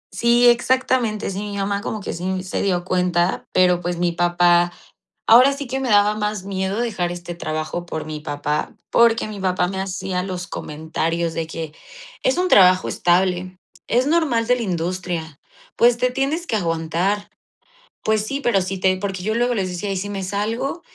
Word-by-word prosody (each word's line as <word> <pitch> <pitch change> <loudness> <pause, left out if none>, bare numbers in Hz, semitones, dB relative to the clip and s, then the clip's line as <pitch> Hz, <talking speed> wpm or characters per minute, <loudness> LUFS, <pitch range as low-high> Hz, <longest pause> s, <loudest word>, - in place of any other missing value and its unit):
Sí, 240 +1 +4
exactamente, 240 -3 +2
sí, 190 - -4
mi 205 -1 -5
mamá 200 0 -1
como 215 - -4
que - - -5
sí 185 +2 -3
se 185 - -3
dio 180 -3 0
cuenta, 180 -1 0
pero, 180 -1 +3
pues, 175 0 -3
mi 175 0 +1
papá 175 0 +3 0.6
ahora 250 +5 +7
sí 280 0 -5
que 265 +2 -3
me 260 - -2
daba 205 0 +4
más 210 -2 -3
miedo 195 +2 -2
dejar 190 -7 -1
este 175 0 -7
trabajo 155 +1 -4
por 160 -3 -5
mi 155 -1 -5
papá, 150 0 -3
porque 230 -2 +3
mi 210 - -7
papá 185 -2 0
me 190 0 -4
hacía 185 -1 -3
los 180 -1 -5
comentarios 165 0 -3
de 165 - -2
que: 160 -1 -6 0.5
"Es 260 - +1
un 365 0 +1
trabajo 185 - +6
estable, 180 +1 +1 0.3
es 250 +3 +2
normal 290 -8 +2
de 250 +1 +3
la 240 - -3
industria. 175 -4 -3 0.4
Pues, 240 0 +4
te 250 +1 +1
tienes 275 +7 -1
que 220 - 0
aguantar". 170 +3 -1 0.7
Pues 215 -1 +1
sí, 275 +5 -3
pero 235 -8 +2
si 185 +1 -4
te 185 0 +2
porque 190 -1 -4
yo 215 +3 -1
luego 245 +1 +1
les 195 -5 -1
decía: 190 +3 -3
"¿Y 190 - -2
si 200 +2 -4
me 200 -1 -4
salgo?". 220 - -2
190 Hz, 185 wpm, -21 LUFS, 175-225 Hz, 0.7 s, ahora